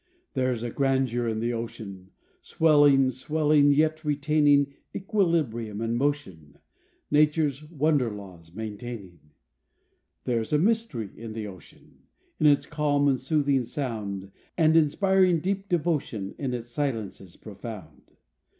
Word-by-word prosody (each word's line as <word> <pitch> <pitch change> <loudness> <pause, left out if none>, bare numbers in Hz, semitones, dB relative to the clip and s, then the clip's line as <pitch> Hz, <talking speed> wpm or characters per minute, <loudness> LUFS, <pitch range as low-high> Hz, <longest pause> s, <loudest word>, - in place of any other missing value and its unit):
There's 130 -4 -1
a 120 - -3
grandeur 130 -3 0
in 110 -1 -2
the 120 +1 -1
ocean, 100 -5 -7 0.3
Swelling, 145 -4 +4
swelling, 150 +1 +2
yet 155 +2 +2
retaining, 145 -1 +2 0.2
Equilibrium 160 - 0
and 115 +1 -1
motion 120 - -3 0.5
Nature's 150 -1 +2
wonder 150 -5 +1
laws 95 -6 -11
maintaining. 110 -4 -7 1.0
There's 115 -3 -1
a - - +5
mystery 190 - 0
in 115 -1 -8
the 110 -1 -5
ocean, 95 -5 -14 0.4
In 155 - +4
its 145 -1 +4
calm 145 -1 +1
and 130 -3 +1
soothing 140 -1 +1
sound, 110 -7 -5 0.3
And 160 -2 +4
inspiring 185 +3 +3
deep 195 +3 -3
devotion, 150 - -1
In 130 -3 -2
its 120 0 -7
silences 110 - -4
profound. 105 -7 -10
135 Hz, 120 wpm, -26 LUFS, 110-150 Hz, 1.0 s, a